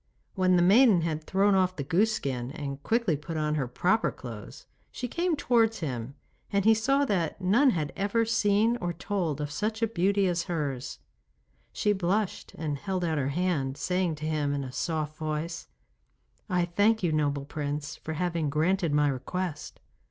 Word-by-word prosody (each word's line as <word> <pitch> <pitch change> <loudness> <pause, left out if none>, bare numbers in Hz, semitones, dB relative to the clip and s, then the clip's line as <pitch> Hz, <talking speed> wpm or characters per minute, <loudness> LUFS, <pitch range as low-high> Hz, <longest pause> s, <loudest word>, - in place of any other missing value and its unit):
When 185 -2 +3
the 175 - +4
maiden 205 0 +6
had 160 -1 -2
thrown 195 +1 +3
off 185 -1 +2
the 140 - -3
goose 195 +10 +2
skin 130 - -3
and 140 -2 -5
quickly 225 -3 +1
put 155 +3 -6
on 150 -1 0
her 140 -4 -1
proper 185 - +1
clothes, 115 -5 -10 0.3
she 250 - -4
came 340 +5 0
towards 225 -6 +2
him 130 -3 -4 0.4
and 200 -1 +1
he 225 - +7
saw 275 +6 +2
that 185 - -1
none 215 +10 +4
had 155 - -1
ever 205 +4 +1
seen 220 +1 +2
or 175 -7 -3
told 170 -4 -2
of 145 -1 -3
such 215 +7 -2
beauty 195 +2 +2
as 175 -2 0
hers. 145 -7 -3 0.7
She 210 - +1
blushed 195 +2 -1
and 150 -3 -3
held 185 -1 -2
out 160 -3 0
her 135 0 0
hand, 145 -4 -1
saying 180 -3 0
to 155 +1 -7
him 150 -2 0
in 140 - -2
a 130 - -6
soft 155 +1 -3
voice: 155 +2 -4 0.8
'I 180 -2 +2
thank 215 +1 +3
you, 170 - +2
noble 145 -2 0
Prince, 145 0 -4
for 160 - -6
having 165 -2 -1
granted 165 +3 +1
my 150 0 +4
request. 150 +5 -4
175 Hz, 175 wpm, -28 LUFS, 150-200 Hz, 0.8 s, he